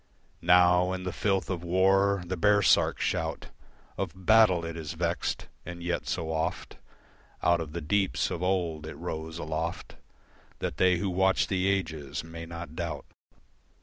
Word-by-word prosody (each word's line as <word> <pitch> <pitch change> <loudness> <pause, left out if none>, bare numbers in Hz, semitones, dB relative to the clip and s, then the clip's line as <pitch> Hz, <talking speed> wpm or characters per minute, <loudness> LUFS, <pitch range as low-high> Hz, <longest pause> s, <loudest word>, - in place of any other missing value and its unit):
Now 90 +1 +5
in 95 0 -4
the 90 - -3
filth 95 0 0
of 90 -2 -3
war, 95 +2 +3
the 95 +2 -3
baresark 100 +2 +3
shout - - -2 0.5
Of 95 -1 -5
battle, 105 -6 +5
it 85 0 -5
is 80 -3 -5
vexed. 85 +1 -2 0.2
And 85 -1 -8
yet 85 0 -2
so 80 -1 -2
oft 80 +3 -3 0.7
Out 85 -1 +3
of 75 -2 -7
the 85 - -4
deeps, 95 +5 0
of 85 - -4
old, 85 -5 -1
it - - -7
rose 80 +1 -5
aloft 80 +1 -4 0.6
That 65 - -4
they 90 +1 +4
who 95 +2 -2
watch 95 +1 +2
the 95 -1 +1
ages 80 -8 -2
may 85 0 -8
not 85 -2 -8
doubt. 80 -5 -4
85 Hz, 155 wpm, -28 LUFS, 80-95 Hz, 0.7 s, Now